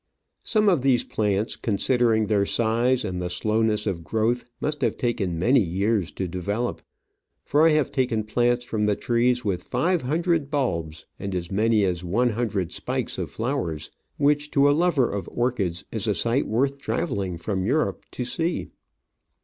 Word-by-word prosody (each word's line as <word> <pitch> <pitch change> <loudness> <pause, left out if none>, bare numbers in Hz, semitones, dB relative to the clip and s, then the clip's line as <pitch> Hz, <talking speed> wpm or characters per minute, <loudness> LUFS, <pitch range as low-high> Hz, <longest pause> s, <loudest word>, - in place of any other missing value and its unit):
Some 215 -2 +2
of 175 -8 +4
these 130 -2 +3
plants, 105 0 -1
considering 115 +1 +2
their 105 -1 +2
size 120 +3 +1
and 90 -1 -3
the 90 - -2
slowness 105 +3 0
of 90 -5 -2
growth, 115 +7 0
must 150 -1 -2
have 120 -4 0
taken 110 -8 -1
many 120 +11 +4
years 100 0 0
to 95 - -3
develop, 100 +7 -3 0.6
for 150 +3 +4
I - - +6
have 150 -2 +1
taken 125 -5 0
plants 120 +3 +1
from 105 -3 -1
the 105 - +2
trees 125 +2 +1
with 95 -4 -1
five 165 +7 0
hundred 160 +2 0
bulbs, 85 - -2
and 100 -1 -4
as 85 0 -4
many 110 +1 +3
as 90 -2 -1
one 115 +8 +1
hundred 105 -6 -2
spikes - - -3
of - - -3
flowers, 110 - -3 0.3
which 145 +1 +2
to 140 +1 +6
a - - +5
lover 150 -6 +2
of 100 -1 -4
orchids 105 -9 -1
is - - -2
a - - +2
sight 120 +4 +1
worth 135 +5 0
travelling 100 - -2
from 95 +2 -2
Europe 155 +6 0
to 125 - -3
see. 165 +7 -2
115 Hz, 170 wpm, -25 LUFS, 100-130 Hz, 0.6 s, I